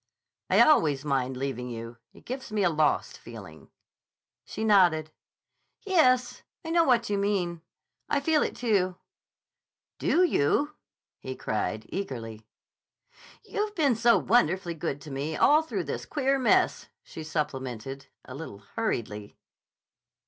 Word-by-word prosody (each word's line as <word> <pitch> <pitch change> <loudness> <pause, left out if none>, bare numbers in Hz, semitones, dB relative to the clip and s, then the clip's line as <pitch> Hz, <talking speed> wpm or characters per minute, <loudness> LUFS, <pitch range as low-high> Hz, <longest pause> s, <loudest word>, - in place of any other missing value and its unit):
"I - - +5
always 150 - +4
mind 130 -2 -1
leaving 125 -2 -3
you. 115 0 -7
It - - -19
gives 260 -2 -6
me 210 -2 0
a 175 - +3
lost 155 -1 0
feeling." 100 -9 -12 0.7
She 220 - -6
nodded. 175 -7 +4 0.7
"Yes; 255 -10 +3 0.2
I 325 - -3
know 335 0 +4
what 245 -5 +3
you 200 - +1
mean. 185 -5 -1 0.5
I - - +2
feel 305 +1 +2
it, - - -1
too." 195 -6 0 1.0
"Do 355 - +3
you?" 290 - +2 0.5
he 130 - -6
cried 110 -1 -3
eagerly. 115 - -6 1.0
"You've 420 0 -3
been 285 - +3
so 235 +1 +4
wonderfully 190 -6 +2
good 155 -3 -4
to 150 - -10
me 145 +3 -3
all 300 +2 +5
through 320 - -3
this - - -5
queer 275 -2 +1
mess," 255 - +2 0.2
she 160 - -9
supplemented, 135 -4 -4 0.2
a 130 - -9
little 130 -8 -9
hurriedly. 105 - -3
170 Hz, 135 wpm, -27 LUFS, -, 1.0 s, I